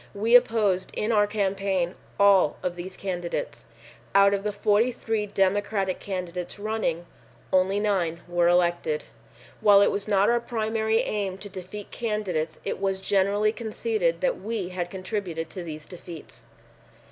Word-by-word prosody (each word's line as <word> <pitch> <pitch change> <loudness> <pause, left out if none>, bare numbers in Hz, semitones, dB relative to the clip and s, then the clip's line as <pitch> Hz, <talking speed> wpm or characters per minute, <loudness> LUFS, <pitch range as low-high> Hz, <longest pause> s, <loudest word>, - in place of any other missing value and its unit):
We 220 +4 0
opposed 215 -6 +3
in 215 - 0
our 205 -2 +4
campaign 195 -3 0 0.3
all 200 -6 +5
of 180 -1 -2
these 180 +1 -7
candidates. 180 - -4 0.5
Out 200 0 +6
of 200 - 0
the 210 +1 -2
43 215 +1 +1
Democratic 195 -1 0
candidates 180 -2 -5
running, 205 -5 -2 0.5
only 190 +2 +3
9.0 175 -6 -1
were 175 0 +2
elected. 175 - +2 0.6
While 205 -1 +6
it - - +3
was 200 - -3
not 200 -1 +3
our 240 0 +3
primary 220 -1 0
aim 200 -3 -2
to 205 +1 -9
defeat 190 +2 -8
candidates 195 -9 -2
it - - -2
was 195 -1 0
generally 200 +2 +2
conceded 440 - -1
that - - 0
we 215 -5 -3
had 180 -1 -4
contributed 185 -3 -4
to 185 - -6
these 155 -3 -7
defeats. 170 -3 -11
200 Hz, 145 wpm, -26 LUFS, 180-215 Hz, 0.6 s, Out